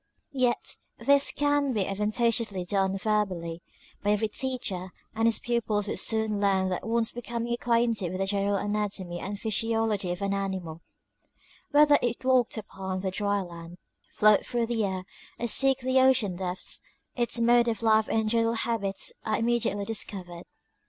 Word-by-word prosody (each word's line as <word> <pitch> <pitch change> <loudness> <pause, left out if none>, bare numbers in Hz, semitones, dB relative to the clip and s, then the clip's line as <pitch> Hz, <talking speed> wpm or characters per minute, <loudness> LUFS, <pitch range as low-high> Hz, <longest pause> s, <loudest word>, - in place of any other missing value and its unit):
Yet, 255 -3 0 0.2
this 280 0 +4
can 290 -2 +1
be 210 -4 +1
advantageously 210 -1 0
done 195 +1 0
verbally, 190 -6 -1 0.4
by 205 - -1
every 215 +1 0
teacher, 215 -7 -3 0.2
and 225 0 +1
his 230 - +2
pupils 220 -4 -1
will - - -2
soon 220 -2 +2
learn 190 -2 +2
that 185 +3 -3
once 230 0 +1
becoming 235 0 -4
acquainted 235 -5 +1
with 185 - -4
the 195 - +1
general 200 +1 0
anatomy 200 -4 -2
and 200 +3 -5
physiology 220 -3 0
of 180 +3 -4
an 200 0 0
animal, 190 -5 -4 0.9
whether 295 0 +5
it 240 +1 -2
walk 255 -3 +2
upon 190 -3 -5
the 190 -1 -2
dry 200 +1 0
land, 170 -1 -10 0.3
float 210 -1 +4
through 240 -1 -1
the 230 -1 -1
air, 190 -2 -2 0.3
or 240 - -3
seek 270 +3 +4
the 260 +1 +2
ocean 260 -8 +3
depths, 180 0 -2 0.3
its 240 -1 0
mode 240 +1 +4
of 230 0 -2
life 220 -1 +4
and 220 -1 0
genei; 230 -1 +2
al 230 - +1
habits 225 -4 -2
are 220 - 0
immediately 230 -3 0
discovered. 185 -5 -5
215 Hz, 160 wpm, -27 LUFS, 195-235 Hz, 0.9 s, whether